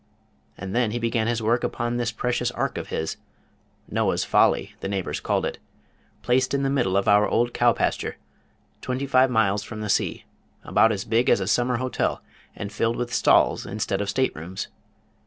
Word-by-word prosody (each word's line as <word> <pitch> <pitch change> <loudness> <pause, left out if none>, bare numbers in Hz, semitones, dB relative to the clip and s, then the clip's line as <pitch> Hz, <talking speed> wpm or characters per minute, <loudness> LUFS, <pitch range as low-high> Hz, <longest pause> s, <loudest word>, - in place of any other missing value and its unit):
And 100 +1 -6
then 120 -2 +2
he 115 - -3
began 115 -1 0
his 115 -1 -1
work 120 +2 +1
upon 120 +1 -2
this 120 -1 -1
precious 125 +1 -1
ark - - -2
of - - -7
his 80 - -3 0.7
Noah's - - 0
Folly, - - +2
the - - -4
neighbors 95 -2 -2
called - - 0
it; - - -4 0.6
placed 130 +2 +2
in 140 - 0
the 135 - +1
middle 120 -9 +1
of 100 - 0
our 105 0 +5
old 120 +1 +1
cow 120 0 +4
pasture, - - -1 0.6
twenty 130 +2 -2
five 130 -1 +4
miles 105 -4 +2
from 110 -2 -7
the 105 - -4
sea; - - 0 0.4
about 110 - +3
as 100 -2 -3
big 115 +2 +2
as - - +4
a 95 - -2
summer 125 +5 +1
hotel, 130 +1 -2 0.3
and 100 0 -6
filled 115 +1 0
with 120 0 -4
stalls - - +3
instead 100 -1 -2
of 100 - -2
state 130 +6 0
rooms! 85 +5 -6
115 Hz, 190 wpm, -24 LUFS, 100-125 Hz, 0.7 s, our